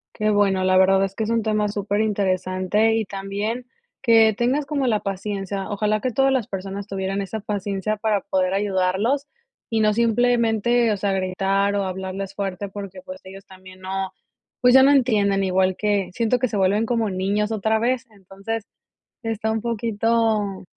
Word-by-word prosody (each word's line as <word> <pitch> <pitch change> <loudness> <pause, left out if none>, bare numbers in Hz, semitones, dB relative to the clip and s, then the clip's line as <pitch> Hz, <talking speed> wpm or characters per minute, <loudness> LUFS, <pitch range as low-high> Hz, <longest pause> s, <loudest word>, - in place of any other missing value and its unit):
Qué 215 0 0
bueno, 200 -2 +2
la 185 0 +3
verdad 190 +1 +5
es 195 0 -7
que 220 - -2
es 215 - -3
un 230 0 +1
tema 215 -1 0
superinteresante 200 0 0
y 225 -1 0
también 200 +5 -4 0.4
que 225 -3 +5
tengas 260 +5 +1
como 280 -2 -1
la 215 -3 +2
paciencia. 195 0 -4
Ojalá 210 0 0
que 255 - -1
todas 270 +3 +2
las 255 -5 0
personas 195 +1 -6
tuvieran 195 0 -3
esa 200 +3 -4
paciencia, 205 0 -2
para 215 -1 0
poder 185 -1 0
ayudarlos 200 +7 0 0.4
y 225 - 0
no 215 -1 +3
simplemente, 235 0 +2
o 210 - 0
sea, 195 0 -1
gritar 195 +2 0
o 200 -1 0
hablarles 190 +1 -5
fuerte 195 0 -3
porque, 195 -1 -8
pues, 185 0 -10
ellos 195 +1 -12
también 185 0 -15
no, 190 0 -4 0.5
pues, 250 0 +5
ya 265 0 +8
no 275 - +6
entienden, 205 -7 +2
igual 185 0 +1
que 205 -3 0
siento 235 +4 +1
que 255 -1 0
se 210 - -3
vuelven 200 +3 +2
como 230 -2 0
niños 200 +3 -1
otra 220 +1 +1
vez, 250 +2 0
entonces, 200 +2 -6 0.6
está 220 -1 -2
un 220 0 -1
poquito 225 -3 0
205 Hz, 175 wpm, -22 LUFS, 195-225 Hz, 0.6 s, ya